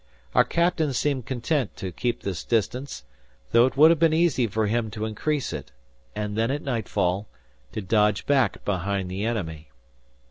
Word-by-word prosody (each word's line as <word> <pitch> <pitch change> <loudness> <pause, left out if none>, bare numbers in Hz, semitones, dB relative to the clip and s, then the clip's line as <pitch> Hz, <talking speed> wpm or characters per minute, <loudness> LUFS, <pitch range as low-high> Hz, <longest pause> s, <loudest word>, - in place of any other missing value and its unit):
Our - - +6
captain 170 -4 +1
seemed 135 -2 -1
content 130 0 -1
to 95 - -5
keep 120 +7 -2
this 95 -5 -3
distance; 120 - -1 0.5
though 115 +2 +6
it 130 - -5
would 155 +3 +8
have 165 - +2
been 160 -1 +4
easy 160 -8 +2
for 110 +1 0
him 110 +1 0
to 105 0 -4
increase 140 +7 -2
it, 70 -2 -7 0.4
and 105 -1 -3
then 115 +2 +1
at 145 +2 -2
nightfall, 105 -5 -1 0.5
to - - -3
dodge 105 0 +2
back 135 -7 +1
behind 95 -1 -1
the 95 +2 -3
enemy. 80 -10 -3
115 Hz, 170 wpm, -25 LUFS, 100-135 Hz, 0.5 s, would